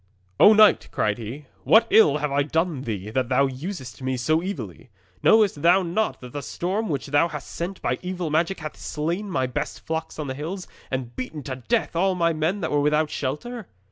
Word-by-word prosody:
'"O 215 - +9
knight," 215 -1 +5
cried 105 +2 0
he, 120 +7 -7 0.2
"what 225 +1 +6
ill 150 -10 +6
have 150 -1 -2
I 140 +1 +2
done 160 +2 0
to 130 - -8
thee, 105 -1 -4
that 130 +1 -1
thou 135 +2 +4
usest 135 - -6
me 130 0 -1
so 155 +6 +1
evilly? 120 - -6 0.3
Knowest 210 -9 +4
thou 180 +4 +5
not 195 +6 -1
that 125 -1 -10
the 145 - -4
storm 190 +10 -2
which 140 -4 -2
thou 145 +4 +3
hast 150 -4 -7
sent 180 +3 -4
by - - 0
evil 180 -3 -3
magic 165 +4 0
hath 155 0 -6
slain 170 +7 -3
my 130 -8 0
best 125 - -4
flocks 160 0 -4
on 155 - -3
the 130 - -3
hills, 170 +7 -5 0.2
and 125 -3 -4
beaten 140 +4 -5
to 130 -1 -5
death - - 0
all 185 +2 +2
my 170 -2 +2
men 160 +6 -1
that - - -2
were 145 -1 +2
without 150 +1 +2
shelter?" 195 - -4
155 Hz, 210 wpm, -24 LUFS, 130-180 Hz, 0.3 s, O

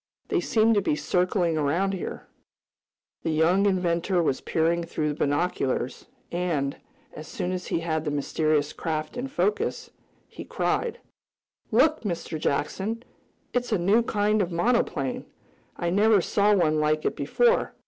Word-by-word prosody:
They 385 - +2
seem 225 -8 +3
to 205 - +3
be 150 - 0
circling 180 -1 +1
around 170 +7 +1
here." 185 - -5 1.0
The - - -2
young 170 +6 +3
inventor 180 -1 +1
was 135 -4 0
peering 170 +1 +1
through 155 -2 -2
the - - -1
binoculars, 145 -4 -1 0.2
and, 165 -6 -1 0.4
as 155 +1 -9
soon 180 - -3
as 185 0 -4
he 165 - -1
had 160 -2 -1
the 155 - -2
mysterious 145 +1 0
craft 155 +1 -3
in 250 +2 -3
focus, 205 -4 -1 0.4
he - - -9
cried: 475 -2 -1 0.7
"Look, 310 0 +3
Mr. 170 -5 -4
Jackson, 195 +12 -2 0.5
it's 245 -1 -1
a 215 - +3
new 195 +6 +3
kind 210 -1 +1
of 180 -2 -1
monoplane. 170 - 0 0.5
I 170 0 -1
never 210 +2 +4
saw 205 +3 +2
one 155 -5 +2
like 155 0 +1
it - - 0
before. 485 0 +1
175 Hz, 150 wpm, -26 LUFS, 155-205 Hz, 1.0 s, never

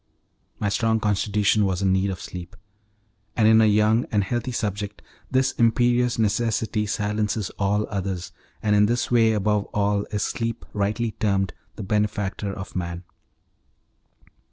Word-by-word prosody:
My 105 - 0
strong 110 +2 +1
constitution 105 0 +2
was 95 -1 0
in 95 -1 +3
need 95 +1 +1
of 95 -2 -4
sleep; 90 0 -8 0.8
and 110 -2 +4
in 110 0 +6
a 110 - +5
young 105 +3 +3
and 105 -2 +2
healthy 120 +5 -2
subject 105 -2 -3 0.3
this 130 0 +2
imperious 120 0 +2
necessity 110 0 0
silences 105 -1 -1
all 105 +1 +1
others, 95 -3 -4 0.3
and 105 -1 +3
in 105 0 +5
this 120 +2 -1
way 115 -2 +5
above 105 0 +1
all 100 0 +1
is 105 -1 -1
sleep 115 0 -3
rightly 105 +3 -1
termed 95 -3 +1 0.2
the 105 - -6
benefactor 105 0 -1
of 100 0 -8
man. 85 -1 -4
105 Hz, 145 wpm, -24 LUFS, 100-110 Hz, 0.8 s, in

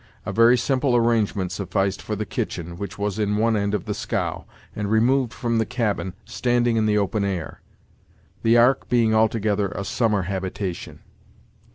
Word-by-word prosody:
A - - -3
very 115 +2 +5
simple 130 0 +1
arrangement 110 -6 +1
sufficed 95 0 -1
for 105 - -4
the 105 +1 -3
kitchen, 85 -2 -4
which 100 -2 -6
was 105 0 -2
in 105 -1 0
one 115 +1 +2
end 100 0 0
of 100 - -4
the - - -2
scow, - - -3 0.3
and 105 -1 -3
removed 120 +3 +2
from 115 -2 -1
the - - +3
cabin, 105 -6 -2
standing 120 -1 +1
in 110 -1 +2
the 105 0 +2
open 100 +1 0
air; 95 -5 -4 0.8
the 115 +1 +4
ark 125 +3 +3
being 115 -3 +3
altogether 110 -2 +2
a 100 - -4
summer 105 -2 +1
habitation. 95 -1 -5
110 Hz, 170 wpm, -23 LUFS, 100-115 Hz, 0.8 s, very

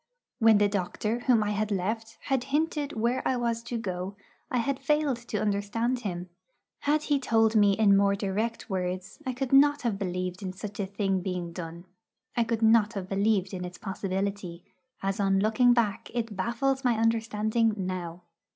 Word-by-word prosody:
When 225 -2 +6
the 205 0 +4
doctor 205 +3 -2
whom 245 -3 +3
I 210 - -1
had 210 +1 -1
left 220 +3 -2
had 265 -3 -1
hinted 295 +1 -1
where 235 +3 0
I 255 - +1
was 235 -1 -1
to 235 0 -4
go, 190 -2 -4 0.3
I 255 - 0
had 265 +3 0
failed 300 -4 +1
to 210 - -2
understand 215 +4 0
him. 180 -6 -4 0.5
Had 300 +1 +1
he 290 -2 +1
told 225 -3 +2
me 205 -2 +5
in 200 -1 +5
more 200 0 +3
direct 210 +4 -2
words, 185 +1 -3
I 255 - 0
could 260 +1 -3
not 290 +1 +5
have 220 -5 -1
believed 180 -1 -3
in 185 -2 -4
such 205 +2 -8
a 195 - -1
thing 195 -1 -1
being 180 -2 -4
done; 170 0 -7 0.5
I 235 - +3
could 225 0 -1
not 220 -1 +5
have 190 -3 -5
believed 200 -1 +1
in 180 -1 -4
its 180 0 -7
possibility, 195 -2 -3 0.4
as 195 +1 -1
on 195 -1 +3
looking 220 +4 +4
back 230 -5 +1
it 225 -3 -2
baffles 250 +7 0
my 245 -3 +2
understanding 225 0 +1
now. 180 -2 -4
215 Hz, 180 wpm, -28 LUFS, 195-235 Hz, 0.5 s, When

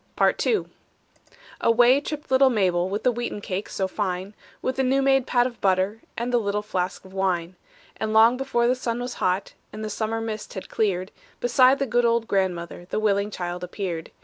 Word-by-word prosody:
PART - - +2
II 440 - +2 1.0
Away 245 +4 +5
tripped 295 -1 -6
little 265 0 +6
Mabel, 185 -6 +1
With 205 +2 -3
the 250 - +4
wheaten 240 -3 -4
cake 195 0 -4
so 190 - -1
fine, 190 0 -3 0.3
With 260 - -2
the 265 - +2
new 265 +1 +2
made 270 -1 +3
pat 245 -1 +3
of 245 -2 -5
butter, 190 +3 +1 0.2
And 240 +1 -2
the 240 - +4
little 210 -1 -1
flask 185 -2 -3
of 190 - -14
wine. 185 -2 -1 0.4
And 220 0 -2
long 225 +2 +6
before 250 -2 0
the 250 - +4
sun 240 -2 -3
was 245 0 -4
hot, 185 +2 0 0.2
And 215 0 -6
the 215 - -4
summer 220 +2 -2
mist 220 -1 -5
had 190 - -7
cleared, 190 -3 -1 0.3
Beside 255 +2 +4
the 275 - 0
good 240 0 +1
old 235 -1 +2
grandmother 175 -3 -2
The - - -1
willing 205 -1 +1
child 180 -2 -5
appeared. 180 -3 -4
215 Hz, 200 wpm, -24 LUFS, 190-245 Hz, 1.0 s, little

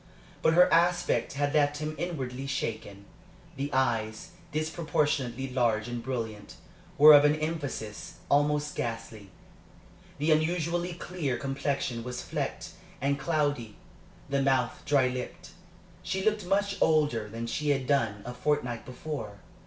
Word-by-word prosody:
But 160 - +4
her 180 +1 +7
aspect 175 +1 +2
had 145 +1 0
left 145 -1 +3
him 155 +1 -3
inwardly 135 -7 -4
shaken. 110 -7 -4 0.5
The 140 +1 -3
eyes, 120 +6 0 0.2
disproportionately 150 -5 -1
large 115 -3 +1
and 120 -1 -4
brilliant, 115 -4 -5 0.4
were 150 +1 +10
of 145 0 +8
an 150 0 +4
emphasis 155 -2 -4
almost 150 +1 +2
ghastly, 115 -3 -5 0.9
the 145 - -2
usually 170 +2 +1
clear 170 -7 -3
complexion 135 -3 -2
was 125 0 -5
flecked - - -4 0.3
and 140 +1 0
cloudy, 145 -7 -1 0.5
the 140 -1 0
mouth 130 -3 +1
dry 140 -3 +4
lipped. 125 +7 -6 0.5
She 190 +2 -2
looked 210 -3 +1
much 200 +1 0
older 145 -9 +2
than 115 +2 -5
she 145 +6 -2
had 135 -2 +1
done 110 -8 +1
a 125 - -5
fortnight 125 -3 -1
before. 125 -6 -6
140 Hz, 130 wpm, -29 LUFS, 120-155 Hz, 0.9 s, were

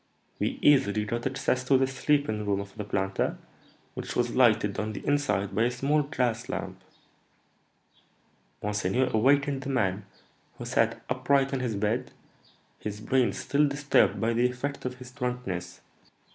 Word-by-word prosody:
We - - -1
easily 110 -7 +4
got 120 +4 -2
access 135 -1 -1
to 135 +1 +5
the 135 - +3
sleeping 135 -4 0
room 100 -1 0
of 100 0 -8
the 105 - -4
planter, 95 -1 -1 0.6
which - - -6
was 120 -1 0
lighted 110 -5 +3
on 110 0 -2
the - - -7
inside 105 -9 0
by 110 +4 +2
a - - +2
small 140 +5 +1
glass 125 -5 -1
lamp. - - -5 1.8
Monseigneur 105 +5 0
awakened 140 +4 +3
the 135 - -5
man, 100 -6 0 0.5
who - - -7
sat - - +1
upright 135 -1 +1
in 135 - 0
his 120 -4 -2
bed, 110 +5 -1 0.7
his 105 -1 -5
brain 125 +3 +2
still 145 +1 +1
disturbed 145 +1 +2
by 115 +1 +1
the 120 +2 +3
effect 140 +3 -5
of 125 0 -3
his 125 0 -11
drunkenness. 110 -9 -4
125 Hz, 155 wpm, -28 LUFS, 105-135 Hz, 1.8 s, to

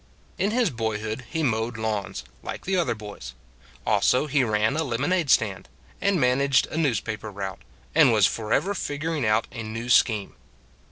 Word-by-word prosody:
In 200 - +2
his 230 -4 +1
boyhood 110 0 -3
he 160 -1 -2
mowed 115 -2 0
lawns, 105 - -3 0.2
like - - -7
the 190 - 0
other 170 -9 +1
boys: 100 - -9 0.5
also 130 +4 +3
he 145 -2 +2
ran 110 +2 +1
a 160 - 0
lemonade 155 +5 0
stand, 105 -6 +2 0.3
and 200 -3 +2
managed 130 +1 +3
a - - -4
newspaper 110 -7 -1
route, 95 -6 -6 0.3
and - - +6
was - - +5
forever 115 - 0
figuring 150 - -2
out 110 0 +2
a 115 - -6
new 115 +2 -5
scheme. 110 -5 +3
115 Hz, 160 wpm, -25 LUFS, 110-150 Hz, 0.5 s, and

